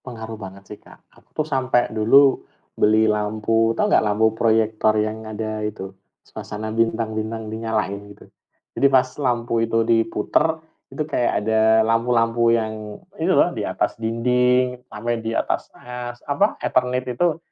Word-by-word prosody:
Pengaruh 115 -3 -8
banget 100 -1 -10
sih 105 +1 -11
Kak. - - -17 0.2
Aku - - -24
tuh 155 - 0
sampai 130 -4 0
dulu, 135 +6 +4 0.3
beli 110 +1 +3
lampu, 110 +1 0
tahu - - +2
nggak 210 - +3
lampu 110 +1 +2
proyektor 110 -1 +2
yang 110 +1 -2
ada 110 0 -4
itu, 100 -3 -5 0.3
suasana 110 +1 -7
bintang-bintang 110 -1 -2
dinyalain 110 -3 -2
gitu? 100 - -15 0.5
Jadi 140 - +3
pas 130 -1 +4 0.2
lampu 120 -3 0
itu 115 0 +1
diputar 115 +7 +1 0.3
itu 155 - -4
kayak 120 -7 0
ada 110 0 +4
lampu-lampu 115 0 +2
yang 110 -2 -2 0.2
itu - - 0
loh - - +3
di - - -3
atas - - -1
dinding 125 +2 +1 0.2
sampai 115 +1 -3
di 115 - -3
atas - - -2
es 120 0 -7
apa 200 +9 +1
eternit 125 0 0
itu. 165 +4 +1
115 Hz, 145 wpm, -21 LUFS, 110-125 Hz, 0.5 s, dulu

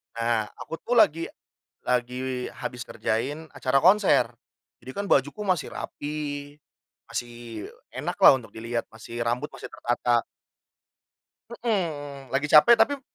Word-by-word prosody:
nah 115 -2 0
aku 165 - -7
tuh 245 - -1
lagi 165 -7 +4 0.6
lagi 125 +1 -1
habis 125 -1 -5
kerjain 130 +8 -2
acara 135 0 +1
konser 195 +2 +5 0.5
jadi 130 - -7
kan 200 0 -2
bajuku 145 +10 +2
masih 185 -6 0
rapi 145 -1 -5 0.5
masih 120 -2 -6 0.2
enak - - -3
lah - - +9
untuk 115 - -14
dilihat, 115 +1 -3
masih 115 +1 -8
rambut 120 +5 -1
masih - - -8
tertata. 120 0 +1 1.3
Mhm, 150 - -3
lagi 140 +2 +1
capek 155 +12 +8
tapi 285 +4 +4
p - - -18
135 Hz, 130 wpm, -26 LUFS, 120-160 Hz, 1.3 s, lah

